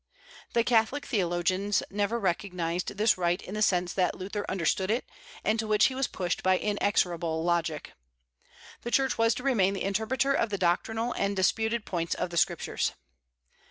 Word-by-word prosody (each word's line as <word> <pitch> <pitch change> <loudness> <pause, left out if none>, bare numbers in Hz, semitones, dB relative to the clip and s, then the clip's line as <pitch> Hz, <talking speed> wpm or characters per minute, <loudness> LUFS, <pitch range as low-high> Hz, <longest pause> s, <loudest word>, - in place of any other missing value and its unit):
The 235 - +3
Catholic 240 +5 +2
theologians 185 -1 0
never 205 +3 0
recognized 180 -2 -2
this 215 -2 +3
right 175 0 +1
in 190 - -9
the 215 - -3
sense 180 -3 +2
that 180 -2 +1
Luther 200 +2 -5
understood 185 +1 0
it, 230 +3 0 0.4
and 220 +1 +1
to 220 - -1
which 210 -1 +4
he 265 - +2
was 265 0 0
pushed 180 -2 -3
by 185 0 +3
inexorable 175 -6 0
logic. 170 -3 -1 0.9
The 240 - -5
Church 265 0 +1
was 230 0 +3
to 250 - -6
remain 200 -8 +2
the - - -3
interpreter 220 +7 0
of 230 - +1
the 200 - -2
doctrinal 220 +7 0
and 200 0 -1
disputed 220 +4 +1
points 170 -2 -2
of 180 - -3
the 170 - -4
Scriptures. - - 0
200 Hz, 170 wpm, -28 LUFS, 180-225 Hz, 0.9 s, which